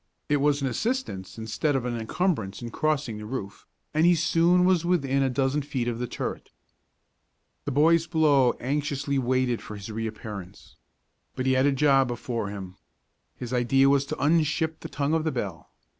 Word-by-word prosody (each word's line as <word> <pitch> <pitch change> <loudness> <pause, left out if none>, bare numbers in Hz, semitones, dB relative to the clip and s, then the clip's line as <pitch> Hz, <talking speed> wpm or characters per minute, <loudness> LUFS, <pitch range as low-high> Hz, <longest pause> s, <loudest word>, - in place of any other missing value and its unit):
It 145 - +3
was 145 0 +2
an - - +1
assistance 135 - -3
instead 115 +7 -1
of 130 -2 -1
an 120 -1 -2
incumbrance 115 - -2
in 120 - -6
crossing 145 -8 -1
the 105 - -7
roof, 105 -5 -6 0.3
and 155 +1 +2
he 175 +1 +6
soon 170 +2 +3
was 180 -3 +3
within 140 -6 +1
a 135 - +2
dozen 135 +3 0
feet 130 -4 -3
of 120 -1 -2
the 125 - -2
turret. - - -5 1.2
The 145 - -2
boys 165 +4 +4
below 150 -6 +3
anxiously 140 +1 -1
waited 130 -1 0
for 105 - -8
his 100 +1 -8
reappearance. 105 -3 -7 0.6
But 130 - -3
he 130 - +3
had 130 +2 +3
a - - +4
job 135 -1 +3
before 120 -3 -3
him. 95 -2 -8 0.6
His 125 0 -6
idea 135 +2 +3
was 140 0 +3
to 155 - -3
unship 160 +1 +1
the - - -8
tongue 145 +2 -1
of 160 -1 +1
the 160 - 0
bell. 100 - -5
135 Hz, 180 wpm, -26 LUFS, 120-155 Hz, 1.2 s, he